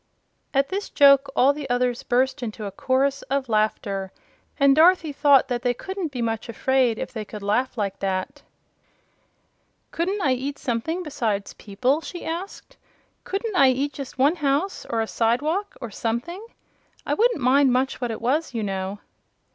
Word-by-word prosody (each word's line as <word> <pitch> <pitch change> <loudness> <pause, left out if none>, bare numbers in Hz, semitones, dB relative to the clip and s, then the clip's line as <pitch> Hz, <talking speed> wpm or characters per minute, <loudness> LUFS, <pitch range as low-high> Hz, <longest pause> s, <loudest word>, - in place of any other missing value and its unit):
At 275 0 +1
this 395 +2 -3
joke 275 -1 +5
all 275 +3 +5
the 285 -2 -7
others 245 0 0
burst 260 +2 0
into 220 -2 -5
a 200 - -4
chorus 270 +5 0
of 275 -1 0
laughter, 200 -3 -1 0.5
and 275 -1 +5
Dorothy 325 -1 +4
thought 280 -2 +5
they 245 0 -1
couldn't 380 +1 -5
be 250 -3 -3
much 225 0 -3
afraid 250 0 +1
if 260 - -5
they 220 -2 -4
could 210 0 -9
laugh 245 +6 0
like 200 -2 -2
that. 190 -1 -3 1.5
"Couldn't 375 +5 -1
I 270 - +3
eat 275 +3 -4
something 295 +9 -2
besides 225 - -2
people?" 250 +9 -1
she 350 +1 -8
asked. 375 +9 -6 0.5
"Couldn't 405 +2 -3
I 275 -6 +6
eat 275 +3 -1
just 270 -2 -8
one 285 +7 +3
house, 295 +6 -1
or 230 -1 0
a 220 - -2
side 235 +4 +1
walk 385 +7 -2
or 235 -4 -7
something? 240 - -3 0.6
I - - 0
wouldn't 470 -4 +2
mind 265 +1 +4
much 260 +1 0
what 245 - -1
it 225 - -5
was, 265 +3 0
you 225 - -1
know." 195 0 -3
265 Hz, 170 wpm, -24 LUFS, 230-295 Hz, 1.5 s, I